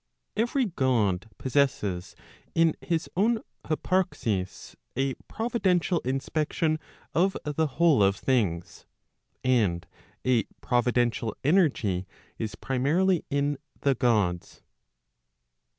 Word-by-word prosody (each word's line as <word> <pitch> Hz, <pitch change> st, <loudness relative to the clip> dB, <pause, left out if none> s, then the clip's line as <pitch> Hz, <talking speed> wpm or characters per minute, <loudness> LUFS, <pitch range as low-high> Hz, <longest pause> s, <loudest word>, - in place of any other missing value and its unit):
Every 240 Hz, +4 st, +1 dB
God 115 Hz, -, +1 dB
possesses 105 Hz, -, 0 dB, 0.4 s
in 165 Hz, -1 st, +4 dB
his 165 Hz, -2 st, -1 dB
own 220 Hz, +4 st, +2 dB, 0.2 s
hyparxis 155 Hz, -, -1 dB, 0.2 s
a 135 Hz, +1 st, 0 dB
providential 190 Hz, -7 st, +1 dB
inspection 155 Hz, +4 st, -1 dB, 0.3 s
of 190 Hz, +3 st, +2 dB
the 150 Hz, +2 st, 0 dB
whole 165 Hz, -8 st, +5 dB
of 100 Hz, 0 st, +4 dB
things. 95 Hz, -6 st, -1 dB, 0.6 s
And 105 Hz, -10 st, +2 dB, 0.4 s
a 125 Hz, -4 st, +3 dB
providential 120 Hz, -2 st, +1 dB
energy 130 Hz, -, +2 dB, 0.3 s
is 110 Hz, -2 st, -3 dB
primarily 160 Hz, -, +1 dB
in 140 Hz, 0 st, 0 dB, 0.2 s
the 140 Hz, -, +3 dB
Gods. 105 Hz, -9 st, 0 dB
135 Hz, 90 wpm, -27 LUFS, 110-165 Hz, 0.6 s, whole